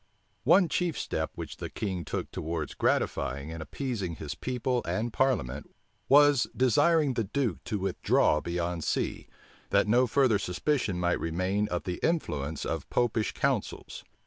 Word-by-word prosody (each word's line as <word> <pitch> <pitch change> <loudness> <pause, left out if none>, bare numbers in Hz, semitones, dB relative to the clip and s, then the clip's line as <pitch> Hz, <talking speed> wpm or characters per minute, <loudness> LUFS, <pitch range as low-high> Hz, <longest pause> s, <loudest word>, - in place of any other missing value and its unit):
One 190 -3 +6
chief 170 0 -1
step - - -2
which - - -7
the - - -5
king 95 -5 -3
took - - -4
towards 80 -1 -3
gratifying 70 +4 0
and 80 0 -6
appeasing 100 - -3
his 75 0 -5
people 125 +5 -1
and 115 +1 -2
parliament, 75 - 0 0.4
was, 145 -2 +6
desiring 145 +4 +4
the 115 -3 -1
duke 115 - -2
to 105 - -2
withdraw 95 -5 +2
beyond 85 -1 -2
sea, - - -2 0.4
that - - +3
no 125 +4 +4
further 125 -4 +3
suspicion 100 +1 -1
might 90 0 +1
remain 95 +5 0
of 90 -3 -3
the 90 -1 -4
influence 80 - -1
of - - -3
Popish 115 -3 +1
counsels. - - -2
105 Hz, 145 wpm, -29 LUFS, 85-130 Hz, 0.4 s, One